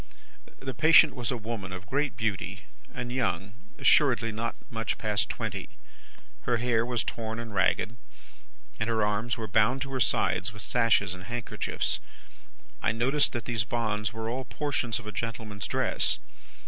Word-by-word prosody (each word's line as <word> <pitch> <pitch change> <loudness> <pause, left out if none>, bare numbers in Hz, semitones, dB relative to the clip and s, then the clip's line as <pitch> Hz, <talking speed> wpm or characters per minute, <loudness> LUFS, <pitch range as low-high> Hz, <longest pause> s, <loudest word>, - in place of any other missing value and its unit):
"The 135 -1 -4
patient 155 +5 +7
was 125 -3 -3
a 125 - 0
woman 110 -4 -5
of 95 +1 -7
great 140 +4 0
beauty, 110 -5 -2 0.3
and 125 -1 -5
young; 100 -6 -1 0.2
assuredly 120 -6 +4
not 115 +2 -3 0.2
much 115 -2 -1
past 105 -2 0
twenty. - - -4 0.7
Her 120 -1 +1
hair 115 -1 +2
was 120 -1 -1
torn 110 -1 -4
and 115 -2 -6
ragged, 110 +4 +2 0.8
and 110 - 0
her 110 -2 +2
arms 105 +3 0
were 110 -1 -4
bound 110 +6 +3
to 140 - -7
her 130 - -1
sides 115 -2 +2
with 100 - -8
sashes 115 -6 +3
and 90 0 -9
handkerchiefs. 120 +2 -2 0.8
I - - +2
noticed 130 +6 +2
that 120 - -3
these 115 -4 0
bonds 105 -2 -1
were 110 0 -4
all 125 +3 -2
portions 130 -4 -1
of - - -8
a 105 - -5
gentleman's 110 -3 -4
dress. - - +2
115 Hz, 160 wpm, -29 LUFS, 105-120 Hz, 0.8 s, patient